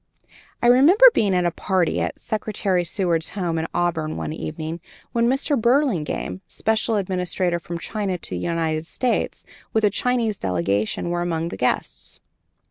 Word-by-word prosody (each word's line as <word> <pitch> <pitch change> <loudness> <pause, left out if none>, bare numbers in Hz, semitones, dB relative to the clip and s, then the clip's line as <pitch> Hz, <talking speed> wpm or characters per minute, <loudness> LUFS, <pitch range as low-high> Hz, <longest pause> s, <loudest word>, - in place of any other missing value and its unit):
I - - +3
remember 325 - +7
being 200 -3 +2
at 180 -1 +2
a 175 - +2
party 185 -1 0
at - - -2
Secretary 205 -4 -1
Seward's 170 -3 0
home, 170 -4 -1
at 160 - -3
Auburn, 160 -3 -1
one 155 - -4
evening, 160 +1 -5 0.3
when 235 0 +2
Mr. 270 +3 +1
Burlingame, 235 - 0
special 220 0 0
ambassador 180 -2 -1
from 170 0 -6
China 195 +1 -3
to - - -8
the 90 - -2
United 160 - -1
States, 250 +5 -1 0.3
with 220 - +2
a 205 - +3
Chinese 230 -1 0
delegation, 100 - -1
were 175 0 -1
among 165 -1 -1
the - - -6
guests. 125 - -2
180 Hz, 155 wpm, -23 LUFS, 165-220 Hz, 0.3 s, remember